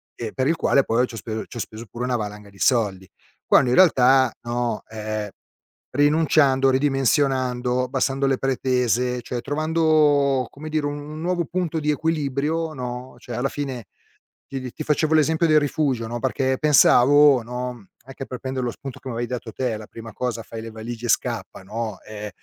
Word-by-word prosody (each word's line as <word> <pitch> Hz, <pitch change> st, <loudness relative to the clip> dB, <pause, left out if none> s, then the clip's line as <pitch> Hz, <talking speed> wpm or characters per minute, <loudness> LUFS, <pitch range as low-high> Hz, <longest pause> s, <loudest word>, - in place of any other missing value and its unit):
ehm, 110 Hz, -3 st, -6 dB
per 130 Hz, -, 0 dB
il 165 Hz, -, +2 dB
quale, 140 Hz, -3 st, +3 dB
poi 125 Hz, +2 st, +1 dB
ci 120 Hz, -, -10 dB
ho -, -, -6 dB
speso 110 Hz, -1 st, -5 dB
ci -, -, -10 dB
ho -, -, -4 dB
speso 110 Hz, +1 st, -6 dB
pure 120 Hz, +5 st, -6 dB
una 125 Hz, -1 st, 0 dB
valanga 105 Hz, -1 st, -6 dB
di 100 Hz, -, -19 dB
soldi. 100 Hz, -7 st, +1 dB, 0.4 s
Quando 125 Hz, -, +4 dB
in 125 Hz, -, +2 dB
realtà, 130 Hz, -7 st, +5 dB
no, 120 Hz, -1 st, -2 dB
ehm, 110 Hz, -1 st, -4 dB, 0.6 s
rinunciando, 145 Hz, -2 st, +3 dB
ridimensionando, 130 Hz, -2 st, +1 dB
abbassando 135 Hz, +2 st, 0 dB
le 135 Hz, -1 st, +2 dB
pretese, 125 Hz, -2 st, 0 dB
cioè, 120 Hz, 0 st, -5 dB
trovando, 150 Hz, -3 st, +2 dB
come 155 Hz, +2 st, -9 dB
dire, 155 Hz, -1 st, 0 dB
un 145 Hz, +2 st, -6 dB
nuovo 175 Hz, 0 st, 0 dB
punto 170 Hz, -1 st, -2 dB
di 150 Hz, 0 st, +1 dB
equilibrio, 155 Hz, +1 st, -1 dB
no, 125 Hz, -1 st, -6 dB
cioè 120 Hz, -1 st, -7 dB
alla 130 Hz, +3 st, 0 dB
fine, 135 Hz, -6 st, -5 dB, 0.6 s
ti 135 Hz, -1 st, -5 dB
ti 125 Hz, -1 st, -6 dB
ti 155 Hz, -, -6 dB
facevo 155 Hz, +1 st, +1 dB
l'esempio 160 Hz, +2 st, +3 dB
del 155 Hz, -1 st, +5 dB
rifugio, 140 Hz, -5 st, -1 dB
no, 120 Hz, +1 st, -4 dB
perché 130 Hz, +1 st, 0 dB
pensavo, 145 Hz, -2 st, +6 dB
no, 125 Hz, -2 st, -6 dB, 0.2 s
anche 135 Hz, 0 st, -8 dB
per 125 Hz, -1 st, -7 dB
prender 130 Hz, -1 st, -3 dB
lo 120 Hz, -, -1 dB
spunto 135 Hz, +2 st, -9 dB
che -, -, -11 dB
mi -, -, -4 dB
avevi 120 Hz, 0 st, -3 dB
dato 120 Hz, -2 st, -5 dB
te, 125 Hz, -4 st, -2 dB
la 110 Hz, -, -9 dB
prima 115 Hz, -1 st, -10 dB
cosa, 125 Hz, -1 st, -3 dB
fai 115 Hz, 0 st, -8 dB
le 115 Hz, 0 st, -8 dB
valigie 115 Hz, +2 st, -7 dB
e -, -, -6 dB
scappa, 115 Hz, -8 st, -1 dB
no, 110 Hz, 0 st, -5 dB
ehm, 105 Hz, -1 st, -7 dB
130 Hz, 185 wpm, -23 LUFS, 120-145 Hz, 0.6 s, pensavo